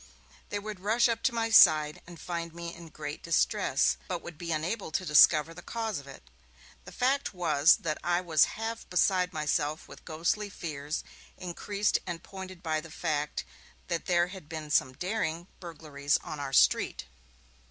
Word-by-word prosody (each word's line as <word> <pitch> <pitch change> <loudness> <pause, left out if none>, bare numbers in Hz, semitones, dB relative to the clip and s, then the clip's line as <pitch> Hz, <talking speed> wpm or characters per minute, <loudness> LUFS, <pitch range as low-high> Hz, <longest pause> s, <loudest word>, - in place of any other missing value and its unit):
They 205 - -2
would 210 -1 -6
rush 220 +6 +3
up 230 -1 -1
to 265 - +2
my 230 -1 -1
side, 155 -7 +6
and 170 -2 -11
find 170 -1 -5
me 170 0 -6
in 170 -1 -11
great 150 -1 -7
distress, 60 - +2
but - - -4
would 175 - -8
be 170 +2 -5
unable 170 +7 -2
to 185 +4 -2
discover 155 0 +6
the 175 - -10
cause 225 -7 -3
of 140 - -13
it. 135 - -11 0.6
The - - -10
fact 265 -3 0
was 160 -3 +4
that 155 -2 -2
I 175 0 +2
was 165 -4 +4
half 225 +1 -5
beside 180 0 +2
myself 155 -1 -1
with - - -13
ghostly 170 +6 -1
fears, 150 -5 -5 0.3
increased 200 +3 -1
and 170 -2 -5
pointed 190 -2 -9
by 155 -2 0
the 165 - -12
fact 150 -2 -2 0.5
that 170 -2 -2
there 175 -1 +3
had 185 -5 -11
been 155 -2 -6
some 130 -3 +2
daring 175 0 -2
burglaries 150 -4 -2
on 150 - -6
our 140 -1 -4
street. 100 - +3
170 Hz, 175 wpm, -29 LUFS, 155-185 Hz, 0.6 s, side